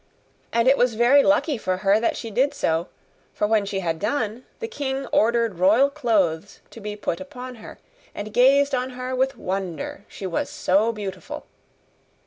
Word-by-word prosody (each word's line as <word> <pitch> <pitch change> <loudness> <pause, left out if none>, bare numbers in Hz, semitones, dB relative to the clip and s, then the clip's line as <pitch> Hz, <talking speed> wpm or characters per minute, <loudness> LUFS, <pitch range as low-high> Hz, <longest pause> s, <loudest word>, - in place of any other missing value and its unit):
And 235 +1 +2
it 270 +1 +5
was 245 -2 +3
very 245 +5 +6
lucky 290 -2 +2
for 185 -3 -1
her 200 +2 +5
that 230 - 0
she 225 - -6
did 265 +7 +1
so, 165 +2 0 0.5
for - - +1
when 210 -1 +2
she 195 -1 -2
had 165 -2 -2
done 225 +1 -2
the 455 - -4
king 275 -9 -3
ordered 230 -4 +2
royal 220 +10 +5
clothes 205 - 0
to - - -11
be 210 -1 -5
put 190 -4 -3
upon 255 -3 -8
her, 220 - -11 0.4
and 205 +1 -6
gazed 275 +3 +4
on 255 0 0
her 255 0 -3
with 265 0 0
wonder, 190 -2 -4
she 195 - -8
was 175 -3 -2
so 205 +5 +2
beautiful. 200 -4 -7
225 Hz, 175 wpm, -23 LUFS, 195-260 Hz, 0.5 s, very